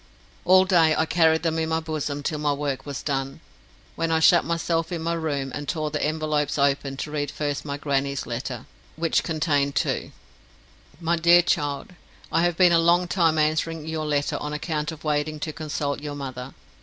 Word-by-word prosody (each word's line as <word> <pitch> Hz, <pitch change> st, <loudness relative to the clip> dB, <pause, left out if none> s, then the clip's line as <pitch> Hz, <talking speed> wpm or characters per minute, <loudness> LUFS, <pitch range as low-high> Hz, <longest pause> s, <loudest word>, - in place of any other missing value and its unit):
All 185 Hz, +1 st, +6 dB
day 165 Hz, -4 st, +4 dB
I 160 Hz, -, +2 dB
carried 160 Hz, -1 st, +3 dB
them 165 Hz, -1 st, 0 dB
in 160 Hz, 0 st, -1 dB
my 160 Hz, 0 st, +1 dB
bosom 150 Hz, -3 st, -4 dB
till 150 Hz, +1 st, -2 dB
my 150 Hz, -1 st, +1 dB
work 140 Hz, -1 st, -3 dB
was 140 Hz, -2 st, -5 dB
done, 135 Hz, -2 st, -2 dB, 0.6 s
when 165 Hz, 0 st, -1 dB
I 160 Hz, -, +3 dB
shut 170 Hz, +1 st, +6 dB
myself 165 Hz, 0 st, -1 dB
in 165 Hz, -2 st, -3 dB
my 170 Hz, +1 st, 0 dB
room 145 Hz, -5 st, -2 dB
and 145 Hz, -1 st, -5 dB
tore 155 Hz, -2 st, -2 dB
the 150 Hz, -, -2 dB
envelopes 150 Hz, -1 st, 0 dB
open 140 Hz, -1 st, +1 dB
to 150 Hz, -, -5 dB
read 145 Hz, -2 st, -2 dB
first 145 Hz, -1 st, -3 dB
my 140 Hz, -1 st, -3 dB
grannie's 140 Hz, -1 st, -1 dB
letter, 120 Hz, +1 st, -5 dB, 0.3 s
which 165 Hz, 0 st, +1 dB
contained 150 Hz, -4 st, 0 dB
two: -, -, -1 dB, 0.9 s
MY 170 Hz, 0 st, 0 dB
DEAR 170 Hz, +1 st, +6 dB
CHILD, 145 Hz, -2 st, -1 dB, 0.4 s
I 165 Hz, -, +2 dB
have 175 Hz, -1 st, +1 dB
been 180 Hz, -2 st, +6 dB
a 170 Hz, -, +5 dB
long 175 Hz, +2 st, +3 dB
time 165 Hz, -3 st, +2 dB
answering 155 Hz, +1 st, 0 dB
your 160 Hz, -1 st, -3 dB
letter 145 Hz, -1 st, 0 dB
on 150 Hz, 0 st, -5 dB
account 150 Hz, 0 st, -2 dB
of 155 Hz, -2 st, -11 dB
waiting 150 Hz, 0 st, -1 dB
to 155 Hz, -, -3 dB
consult 145 Hz, -2 st, -3 dB
your 145 Hz, -1 st, -5 dB
mother. 130 Hz, -2 st, -7 dB
155 Hz, 195 wpm, -24 LUFS, 145-165 Hz, 0.9 s, All